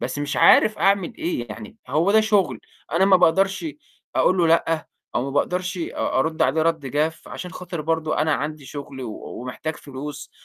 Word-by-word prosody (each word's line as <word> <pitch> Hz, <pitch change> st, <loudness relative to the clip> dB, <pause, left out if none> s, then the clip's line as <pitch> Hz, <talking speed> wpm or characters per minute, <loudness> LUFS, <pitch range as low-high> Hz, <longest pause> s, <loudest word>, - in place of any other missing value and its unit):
بس 130 Hz, +3 st, -3 dB
مش 145 Hz, 0 st, -2 dB
عارف 215 Hz, -, +6 dB
أعمل 195 Hz, -2 st, +2 dB
إيه 120 Hz, -8 st, -2 dB
يعني 105 Hz, 0 st, -9 dB
هو 165 Hz, +6 st, +2 dB
ده 220 Hz, -, +6 dB
شُغل، 210 Hz, -3 st, +1 dB, 0.3 s
أنا 170 Hz, +4 st, +4 dB
ما 195 Hz, -1 st, +6 dB
باقدرش 190 Hz, -, +2 dB, 0.5 s
أقول 185 Hz, -, +3 dB
له 170 Hz, -, +4 dB
لأ 165 Hz, -1 st, +2 dB, 0.3 s
أو 120 Hz, -, +1 dB
ما 140 Hz, -, -3 dB
باقدرش 180 Hz, +5 st, -1 dB
أ 165 Hz, -, -2 dB
أرُد 160 Hz, +3 st, +1 dB
عليه 155 Hz, +5 st, +2 dB
رَد 160 Hz, -3 st, 0 dB
جاف، 150 Hz, +4 st, -1 dB
عشان 180 Hz, -, -7 dB
خاطر 180 Hz, -2 st, -6 dB
برضه 160 Hz, 0 st, -1 dB
أنا 155 Hz, 0 st, +2 dB
عندي 150 Hz, 0 st, -4 dB
شُغل 140 Hz, -2 st, -7 dB
و 115 Hz, -4 st, -5 dB, 0.3 s
ومحتاج 150 Hz, +5 st, -5 dB
فلوس 145 Hz, +1 st, -8 dB
160 Hz, 185 wpm, -23 LUFS, 145-180 Hz, 0.5 s, عارف